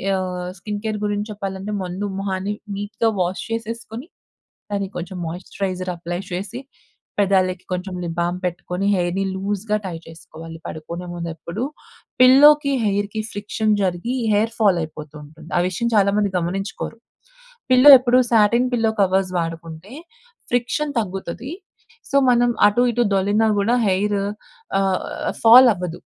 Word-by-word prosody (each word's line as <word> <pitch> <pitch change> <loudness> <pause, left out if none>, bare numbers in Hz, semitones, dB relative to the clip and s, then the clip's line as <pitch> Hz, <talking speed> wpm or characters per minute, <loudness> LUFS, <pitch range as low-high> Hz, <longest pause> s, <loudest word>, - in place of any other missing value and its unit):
ఆహ్, 180 -1 -3
skin 210 0 -5
care 215 -1 -1
గురించి 205 +1 -2
చెప్పాలంటే, 195 0 -5
ముందు 185 +3 -4
మొహాన్ని 195 +1 -2 0.2
నీట్‌గా 210 +3 -1
వాష్ 180 +1 -1
చేసేసుకొని, 230 +4 -5 0.6
దాన్ని 200 -1 -1
కొంచెం 180 +2 -6
మాయిశ్చరైజర్ 185 +2 -4
అప్లై 175 +1 -5
చేసి, 200 +7 -4 0.6
పెదాలకి 185 -2 +1
కొంచెం 180 +1 -4
లిప్ 170 0 -5
బామ్ 175 +1 -1
పెట్టుకొని, 180 +2 -3
హెయిర్‌ని 180 +2 -1
లూజ్‌గా 205 +2 -2
టై 180 -3 -4
చేసుకోవాలి. 165 0 -11
పడుకునే 170 +3 -7
ముందు 170 -1 -4
ఎప్పుడు 170 +7 -5 0.6
పిల్లోకి, 280 +2 +7
హెయిర్‌‌కి 205 +1 -1
ఫ్రిక్షన్ 210 +1 -1
జరిగి 185 +8 -1 0.2
హెయిర్ 220 +2 +1
ఫాల్ 195 -5 +4
అయిపోతూంటుంది. 155 +1 -11
ఆ - - +3
విషయం 235 +6 -2
చాలా 200 -1 +4
మంది 200 -2 0
గమనించుకోరు. 195 +6 -4 0.7
పిల్లో 255 +3 +8
ఎప్పుడు 250 0 +3
సాటిన్ 235 +3 +4
పిల్లో 225 -2 +2
కవర్స్ 190 -1 +2
వాడుకుంటే, 165 +5 -6 0.6
ఫ్రిక్షన్ 255 +5 0
తగ్గుతది. 195 +5 -5 0.6
సో, 280 - +2
మనం 245 0 +4 0.2
అటు, 210 +4 +2
ఇటు 240 +1 +1
దొర్లిన 205 +3 +2
గూడా 230 +5 +2
హెయిరు 200 +1 +1 0.6
ఆహ్, 190 -1 +1 0.4
ఫాల్ 245 +3 +9
అవ్వదు. 175 -1 -5
195 Hz, 130 wpm, -21 LUFS, 180-220 Hz, 0.7 s, ఫాల్